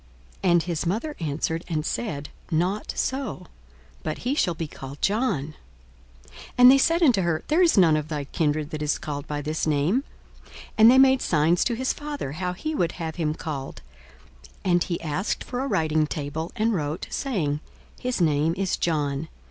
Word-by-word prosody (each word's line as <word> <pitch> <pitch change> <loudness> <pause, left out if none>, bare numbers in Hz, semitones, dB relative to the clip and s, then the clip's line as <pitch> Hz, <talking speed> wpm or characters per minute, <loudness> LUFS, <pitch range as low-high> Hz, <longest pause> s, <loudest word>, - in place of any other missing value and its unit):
42:001:060 185 - +4
And 170 -1 +4
his 170 -1 -2
mother 235 - -2
answered 160 +1 -2
and 155 -3 -2
said, 145 -10 -3 0.2
Not 180 +5 0
so; 260 -9 -2 0.6
but 155 - -3
he 250 +3 -1
shall 180 - +1
be 165 - -3
called 135 0 -9
John. 195 - 0 0.7
42:001:061 65 - -22 0.2
And 250 +1 +9
they 275 - +6
said 335 +5 +3
unto 245 -11 +5
her, 170 -3 0
There 315 +4 +4
is 345 -9 +4
none 170 -5 +6
of 155 -1 -2
thy 150 -2 -3
kindred 150 +1 -1
that 155 - -4
is 150 -1 +1
called 145 -2 -5
by 145 0 -3
this 155 +2 -2
name. 155 - +2 0.4
42:001:062 - - -20 0.3
And 220 +1 +9
they 255 - +6
made 265 0 +6
signs 165 +2 +2
to 240 - 0
his 260 +3 0
father, 290 - -5
how 180 +4 -3
he 310 - -4
would 175 - 0
have 165 -2 -5
him 155 -2 0
called. 140 -5 -6 0.8
42:001:063 185 - +2
And 175 -1 +4
he 170 - -3
asked 165 +5 -2
for 245 - -5
a 270 - -1
writing 155 - +1
table, 150 +3 -4
and 225 0 +1
wrote, 150 -3 -2
saying, 165 - -1 0.4
His 250 -3 -2
name 155 0 +2
is 195 -1 0
John. 150 -2 -1
170 Hz, 190 wpm, -25 LUFS, 150-225 Hz, 0.8 s, And